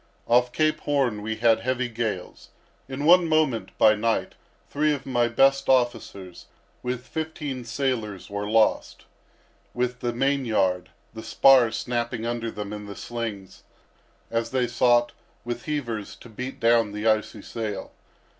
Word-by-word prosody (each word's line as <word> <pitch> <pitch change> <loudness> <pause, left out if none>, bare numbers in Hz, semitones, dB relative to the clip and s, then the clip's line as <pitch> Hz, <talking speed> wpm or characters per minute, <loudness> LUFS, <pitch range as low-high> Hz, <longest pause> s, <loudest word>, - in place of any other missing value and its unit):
Off 120 +1 +3
Cape 155 +2 +1
Horn 135 -7 0
we 110 +1 -3
had 115 0 +3
heavy 130 +2 -1
gales. 110 -6 -5 0.4
In 135 +2 -4
one 175 0 +6
moment, 155 -7 +1
by 110 - +6
night, 110 +1 -1 0.3
three 150 +1 +1
of 140 - -10
my 120 -3 +1
best 135 +3 +3
officers, 120 -8 -1 0.3
with 125 0 -4
fifteen 150 -5 -5
sailors, 115 -6 -3
were 100 0 -4
lost, 110 0 +1 0.7
with 125 0 -1
the 120 - -1
main 135 +3 0
yard; 95 -6 0 0.2
the 110 - -7
spar 130 0 +5
snapping 120 0 -3
under 115 -1 -2
them 105 -1 -6
in 105 -1 -7
the 100 - -8
slings, 110 -5 -6 0.7
as 115 0 -1
they 130 0 +1
sought, 120 0 +3 0.3
with 120 0 -5
heavers, 120 -10 -4
to 120 - -14
beat 125 +4 -7
down 115 -2 +3
the 105 +1 -5
icy 110 -1 0
sail. 105 -4 -5
120 Hz, 145 wpm, -25 LUFS, 110-130 Hz, 0.7 s, one